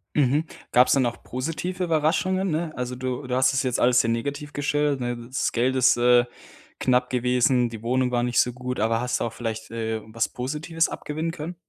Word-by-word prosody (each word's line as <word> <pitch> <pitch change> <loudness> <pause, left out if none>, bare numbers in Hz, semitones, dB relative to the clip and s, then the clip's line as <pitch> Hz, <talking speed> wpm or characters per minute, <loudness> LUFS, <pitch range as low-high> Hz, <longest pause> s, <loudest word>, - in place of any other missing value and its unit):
Mhm. 145 +2 +2 0.3
Gab's 125 +1 +5
dann 135 -2 +3
auch 120 0 -3
positive 165 +8 -3
Überraschungen, 165 +4 +1
ne? 160 0 -2
Also, 125 0 -4
du 130 +1 -4
du 125 - -1
hast 130 +1 +3
das 135 - +1
jetzt 125 -2 -1
alles 125 0 +5
sehr 115 - -1
negativ 140 +5 -3
gestellt, 145 -1 0
ne? 120 -1 -2
Das 130 +1 -1
Geld 125 +2 +1
ist, 130 -1 +4
äh, 120 0 +5 0.5
knapp 125 -1 +2
gewesen. 125 0 +2
Die 115 -2 -8
Wohnung 125 +1 +1
war 120 -1 +1
nicht 120 0 +1
so 125 - +3
gut. 125 +1 -5
Aber 115 +2 +1
hast 125 0 -1
du - - -1
auch 115 - -4
vielleicht, 110 -1 -5
äh, 110 -1 -3
was 110 +1 -2
Positives 150 +6 -2
abgewinnen 155 +2 -4
können? 165 +1 -6
125 Hz, 205 wpm, -24 LUFS, 120-150 Hz, 0.5 s, Gab's